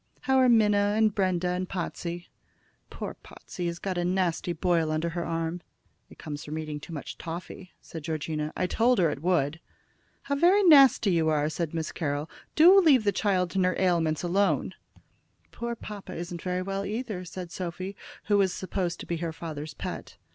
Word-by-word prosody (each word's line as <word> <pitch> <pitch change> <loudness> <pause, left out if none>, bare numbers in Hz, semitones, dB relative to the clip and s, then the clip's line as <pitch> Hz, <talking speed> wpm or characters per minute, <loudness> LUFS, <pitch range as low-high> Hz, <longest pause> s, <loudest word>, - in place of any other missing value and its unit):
How 265 -1 +2
are 255 -1 +5
Minna, 210 -3 +4
and 220 -1 +3
Brenda, 185 -3 0
and 180 +1 -2
Potsey?" 175 -1 -5 0.6
"Poor - - -6
Potsey 175 -1 -7
has 170 0 -3
got 185 0 -3
a - - 0
nasty 180 -1 0
boil 170 -2 +1
under 155 +2 -1
her 170 +1 -3
arm." 165 +1 -3 0.5
"It - - -15
comes 150 -1 -6
from 155 +1 -5
eating 155 -1 -4
too 160 - -11
much 150 -3 -7
toffy," 175 +2 -7
said 160 -3 -9
Georgina. 155 -1 -3
"I 185 - +1
told 235 +6 +2
her 170 -4 +3
it 140 - -6
would." 160 -3 +1 0.6
"How 280 - -2
very 360 +8 +4
nasty 275 - +7
you 165 -2 +2
are!" 150 -1 +1
said 165 0 -3
Miss 160 -1 -2
Carroll. 145 -1 -3 0.2
"Do 355 +5 +8
leave 280 - +5
the 205 - +3
child 185 -3 0
and 190 - +3
her 185 0 +2
ailments 170 -4 +1
alone!" 195 +3 +1 0.8
"Poor 235 0 -4
papa 210 -3 -8
isn't 170 0 -6
very 180 0 -2
well, 195 +1 -3
either," 210 -2 -4
said 180 0 -8
Sophy, 185 +2 -5 0.3
who 205 -1 +2
was 190 -2 +3
supposed 185 -2 -3
to - - -7
be 170 - -2
her 165 0 -3
father's 155 -2 -7
pet. - - -7
180 Hz, 185 wpm, -27 LUFS, 165-200 Hz, 0.8 s, Do